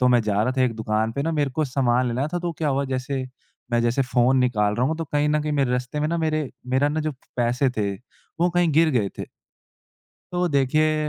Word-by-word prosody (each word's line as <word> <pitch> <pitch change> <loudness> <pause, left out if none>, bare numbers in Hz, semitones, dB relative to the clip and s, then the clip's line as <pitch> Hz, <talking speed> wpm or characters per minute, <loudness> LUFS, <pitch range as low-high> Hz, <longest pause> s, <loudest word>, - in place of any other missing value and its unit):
तो 125 - +4
मैं 120 -1 +5
जा 105 -1 +1
रहा 125 - 0
था 130 - +4
एक 125 -2 +1
दुकान 110 0 -1
पे 140 - -2
ना 165 - 0
मेरे 145 -3 0
को 155 +4 -1
सामान 125 -2 +1
लेना 125 +4 -1
था 175 - 0
तो 175 -1 -3
क्या 155 - 0
हुआ 140 0 +1
जैसे 130 0 -3 0.5
मैं 120 - +3
जैसे 120 +3 +2
फ़ोन 125 0 +2
निकाल 105 -5 +2
रहा 125 +2 +2
हूँ 160 +3 -1
तो 165 - -3
कहीं 145 0 0
न 150 0 +2
कहीं 150 - -2
मेरे 140 -4 +1
रास्ते 125 +4 -2
में 150 - +1
ना 170 +1 -1
मेरे 155 -3 0 0.3
मेरा 140 +2 +3
ना 155 +2 -1
जो 155 -1 -2 0.2
पैसे 125 +2 +1
थे 100 -2 0 0.5
वो 175 +1 +3
कहीं 175 -1 +2
गिर 160 +2 +4
गए 115 -8 +1
थे। - - -3 1.1
तो 180 0 +1
देखिए 155 +2 +2
135 Hz, 245 wpm, -23 LUFS, 125-155 Hz, 1.1 s, मैं